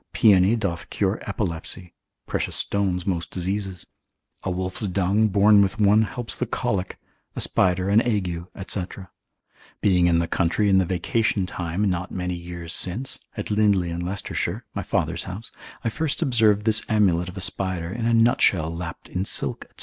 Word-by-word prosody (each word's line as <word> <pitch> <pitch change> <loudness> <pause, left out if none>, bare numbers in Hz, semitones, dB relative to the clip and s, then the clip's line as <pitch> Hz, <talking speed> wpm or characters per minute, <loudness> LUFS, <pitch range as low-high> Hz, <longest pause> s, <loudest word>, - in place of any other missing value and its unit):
Paeony 100 0 +5
doth 100 -7 -3
cure - - 0
epilepsy; 85 +1 -4 0.3
precious - - -2
stones 95 -3 0
most 85 -3 -2
diseases; 95 0 -3 0.6
a - - -3
wolf's 95 +3 -2
dung 100 +3 +2
borne 105 +1 +5
with 100 +2 0
one 105 +1 +5
helps 115 +2 -3
the - - -2
colic, 95 -2 -2 0.4
a - - -3
spider 90 0 +2
an 105 +3 +5
ague, 95 -8 -1 0.2
&c. 95 - -1 1.0
Being 90 -3 +3
in 85 -1 +3
the 85 0 +1
country 95 +5 +1
in 95 -1 +5
the 95 - +2
vacation 95 +3 0
time 90 +3 -2
not 90 0 -1
many 90 -1 -3
years 85 -1 -6
since, 120 +9 -1 0.2
at - - -4
Lindley 100 -5 +2
in 85 - -3
Leicestershire, 95 +3 -3
my - - -3
father's - - -1
house, 95 +5 -8 0.3
I 115 - +1
first 150 +5 -1
observed 110 -5 +3
this 110 -1 +5
amulet 90 -5 +2
of 90 - -10
a - - -3
spider 95 -2 -1
in 115 +2 -2
a 115 - +2
nut 115 +1 +4
shell 85 -3 +2
lapped 85 0 -7
in 90 - -2
silk, - - -1
&c. - - -14
95 Hz, 175 wpm, -24 LUFS, 90-105 Hz, 1.0 s, Paeony